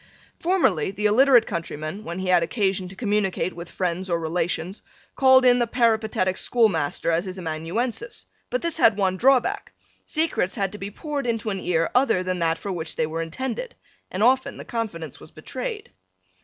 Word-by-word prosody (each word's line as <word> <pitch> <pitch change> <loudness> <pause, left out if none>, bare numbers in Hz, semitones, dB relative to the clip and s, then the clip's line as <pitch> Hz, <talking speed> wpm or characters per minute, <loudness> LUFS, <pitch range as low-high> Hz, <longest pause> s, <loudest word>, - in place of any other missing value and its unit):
Formerly 330 - +2
the 205 +2 -4
illiterate 240 +2 +6
countryman, 160 +3 -5
when 170 -1 -5
he 185 0 -3
had 180 -1 +5
occasion 190 0 0
to 190 - -11
communicate 200 -3 -1
with 170 0 -8
friends 185 +1 -2
or 170 -1 +1
relations, 170 +3 -2 0.3
called 260 -1 +6
in 245 0 +6
the 240 - +1
peripatetic 220 -6 +1
schoolmaster 170 -9 +1
as 165 +3 +1
his 185 0 -6
amanuensis, 185 - -3 0.2
but - - -2
this 335 -2 -1
had 220 -3 +5
one 190 -2 +1
draw 260 +6 +5
back, 400 +7 -5 0.3
secrets 310 - -1
had 195 -4 -1
to 210 - -8
be 195 - -5
poured 285 +4 -4
into 225 -2 -1
an 195 - -3
ear 165 -2 0
other 245 -8 +3
than 185 -1 -2
that 165 -1 +1
for 200 - -5
which 165 -3 -4
they 160 - +1
were 160 +1 -3
intended, 260 - -4 0.3
and 190 +3 -1
often 260 +2 +3
the - - -9
confidence 205 -9 -5
was - - -12
betrayed. 450 -4 -6
195 Hz, 185 wpm, -24 LUFS, 175-245 Hz, 0.3 s, illiterate